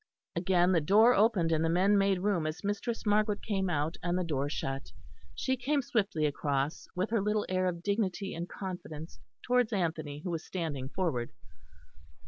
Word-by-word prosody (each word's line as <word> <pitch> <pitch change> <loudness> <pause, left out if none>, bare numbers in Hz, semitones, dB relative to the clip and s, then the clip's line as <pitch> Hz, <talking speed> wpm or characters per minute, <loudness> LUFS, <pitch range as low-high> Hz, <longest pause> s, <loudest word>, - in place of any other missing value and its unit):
Again 175 +1 +3
the 170 -3 +3
door 215 +10 +6
opened, 200 -7 +3
and 160 0 +2
the 165 - +2
men 185 +5 +4
made 195 -2 +2
room 185 -6 +1
as 155 +3 -5
Mistress 210 +4 -2
Margaret 210 0 +2
came 195 -3 0
out, 155 0 -1
and 175 +1 0
the 185 - 0
door 145 -4 -1
shut. 135 -2 -4 0.4
She 260 - 0
came 275 +3 0
swiftly 200 -10 0
across, 145 0 -1
with 185 +4 -1
her 225 -3 +2
little 210 +1 0
air 185 0 +1
of 170 -1 -3
dignity 200 -1 -1
and 170 +2 -5
confidence, 175 -5 -7 0.2
towards 250 -2 +2
Anthony, 160 -7 -2
who 180 - -3
was 165 -1 -3
standing 150 -7 -4
forward. 150 -10 -2
180 Hz, 175 wpm, -31 LUFS, 160-205 Hz, 0.4 s, door